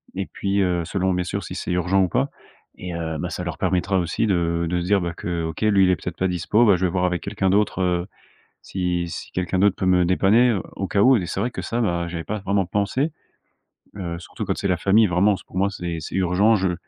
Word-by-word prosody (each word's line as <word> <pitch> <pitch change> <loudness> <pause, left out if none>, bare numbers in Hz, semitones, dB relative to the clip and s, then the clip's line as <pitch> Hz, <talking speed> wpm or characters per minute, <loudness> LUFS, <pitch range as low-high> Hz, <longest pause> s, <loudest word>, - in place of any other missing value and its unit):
et 95 0 -2
puis, 100 +1 -2
heu, 90 -2 +1
selon, 95 +2 -1
bien 90 0 0
sûr, 100 +3 -3
si 90 - -7
c'est - - -4
urgent 90 +2 +2
ou 90 - 0
pas - - 0 0.5
et 90 -1 -6
heu, 80 -1 -3
bah, - - -3
ça - - -5
leur - - -4
permettra 95 +1 0
aussi 90 +5 0
de 85 -3 +1
de 90 +1 0
se - - -4
dire, 100 +2 +3
bah, 85 -1 -3
que 85 -2 -3
OK, 80 -1 -6
lui, 100 -3 +4
il - - +3
est 90 - +4
peut-être 90 - -7
pas 95 - +1
dispo, 90 +6 +2
bah, 100 -4 +6
je 90 +1 0
vais 90 - 0
voir 90 0 +1
avec 90 -1 -1
quelqu'un 95 - -1
d'autre, 100 0 +1
heu, 90 -1 0 0.6
si 90 -2 -2
si 85 - -7
quelqu'un 90 0 -1
d'autre 100 0 +4
peut 95 - -2
me 90 -1 +4
dépanner, 100 +7 +4
heu, 105 -6 0
au 95 - -3
cas 100 +2 +1
où 130 +3 +6
et 95 -7 0
c'est - - -3
vrai 120 +5 -1
que - - -5
ça, 115 - -3
bah, 85 -6 0
j'y 85 - -6
avais 80 - -4
pas 110 0 -3
vraiment 100 0 0
pensé, 105 - -1 0.9
heu, 85 -3 -4
surtout 90 - -7
quand - - -2
c'est 100 - -1
la 90 - +2
famille. 105 +5 +4
Vraiment, 95 +3 +3
s - - -11
pour - - -10
moi, 100 +1 +2
c'est 85 -4 -5
c'est 80 - -7
urgent. 95 +4 +3
Je 95 -2 +1
en - - -1
95 Hz, 270 wpm, -23 LUFS, 90-100 Hz, 0.9 s, bah